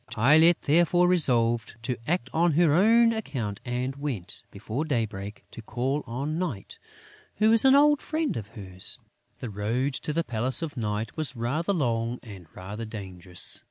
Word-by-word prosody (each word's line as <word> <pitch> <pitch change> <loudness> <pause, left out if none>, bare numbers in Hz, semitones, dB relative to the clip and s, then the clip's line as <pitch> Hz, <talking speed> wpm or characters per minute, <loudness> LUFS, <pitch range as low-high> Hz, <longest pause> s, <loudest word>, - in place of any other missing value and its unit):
Tylette, 155 +9 +5
therefore, 175 +3 +4
resolved 120 - +2
to 125 +1 -1
act 175 +3 0
on 170 0 +3
her 160 -1 +4
own 230 +6 +5
account 120 - -4
and 125 +2 -3
went, 125 -11 -4
before 110 +8 -4
daybreak, 110 -8 -3
to - - -9
call 130 +6 -2
on 140 +7 -3
Night, 135 - -5 0.6
who 215 +1 +3
was 230 +2 +4
an 265 +1 +7
old 295 0 +5
friend 315 -2 -2
of 105 -3 -5
hers. 95 -2 -5 0.4
The 120 - -5
road 115 +7 -1
to 150 - -4
the 165 +2 0
Palace 125 +3 0
of 155 -3 -5
Night 105 -2 -3
was 155 -4 -2
rather 140 - -1
long 120 -8 -1
and 95 -7 -11
rather 100 +5 -7
dangerous. 95 -5 -6
130 Hz, 160 wpm, -26 LUFS, 110-165 Hz, 0.6 s, an